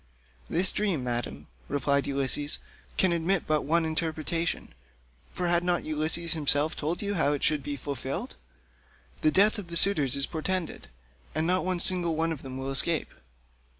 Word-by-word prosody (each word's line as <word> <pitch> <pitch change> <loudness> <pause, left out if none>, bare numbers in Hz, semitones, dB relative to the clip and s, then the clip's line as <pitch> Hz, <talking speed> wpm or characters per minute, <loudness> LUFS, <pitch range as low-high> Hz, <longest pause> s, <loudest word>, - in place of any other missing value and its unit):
"This 185 +3 +2
dream, 190 -10 -1
Madam," 120 -1 -3 0.2
replied 140 0 0
Ulysses, 140 +1 +1 0.4
"can 185 -2 +3
admit 170 +2 +1
but 155 - +2
of - - -8
one 165 +3 +2
interpretation, 160 +1 -2 0.6
for 180 - -2
had 175 0 +2
not 175 -1 0
Ulysses 155 +2 -1
himself 150 -1 +3
told 165 +6 -3
you 205 0 -1
how 150 -6 +2
it 145 - -3
shall 155 0 +3
be 145 +1 -5
fulfilled? 140 - -5 0.9
The 310 - +4
death 210 -4 +4
of 195 - -8
the 170 0 -2
suitors 150 -10 +4
is 140 0 +1
portended, 180 +1 -3 0.5
and 155 +1 +1
not 185 +2 +2
one 185 -1 0
single 175 -2 +2
one 165 +1 0
of 155 - -5
them 130 -1 -7
will 135 +1 -4
escape." 155 +4 +3
160 Hz, 170 wpm, -27 LUFS, 145-175 Hz, 0.9 s, The